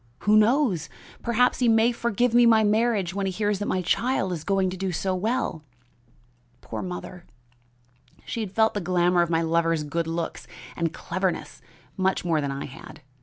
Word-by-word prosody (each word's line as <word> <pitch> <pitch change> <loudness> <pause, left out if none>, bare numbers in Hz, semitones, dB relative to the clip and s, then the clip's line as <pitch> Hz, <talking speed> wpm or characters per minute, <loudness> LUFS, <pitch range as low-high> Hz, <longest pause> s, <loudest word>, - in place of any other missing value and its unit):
Who 210 +1 +3
knows? 215 - +3 0.3
Perhaps 240 +1 +2
he 250 - +2
may 225 +1 +4
forgive 235 0 0
me 240 0 +6
my 220 -1 +5
marriage 210 -4 +1
when 195 0 -2
he - - -1
hears 205 +1 -1
that 205 - -3
my 185 - -1
child 195 0 0
is 160 -3 -5
going 195 -1 +1
to - - -5
do 190 0 -3
so 185 +2 -1
well!' 195 -4 -2 1.0
Poor - - -6
mother! 180 -1 -7 1.0
she - - -4
had 210 -4 -4
felt 220 +2 +2
the 205 - -2
glamour 175 0 +2
of 170 - 0
my 165 0 +1
lover's 165 -1 +1
good 165 +3 -2
looks 165 +1 -4 0.3
and 165 -2 -1
cleverness 185 +1 -3 0.4
much 190 -1 0
more 165 -3 +1
than 140 -1 -2
I 135 +1 -5
had. 135 - -12
190 Hz, 180 wpm, -25 LUFS, 170-220 Hz, 1.0 s, me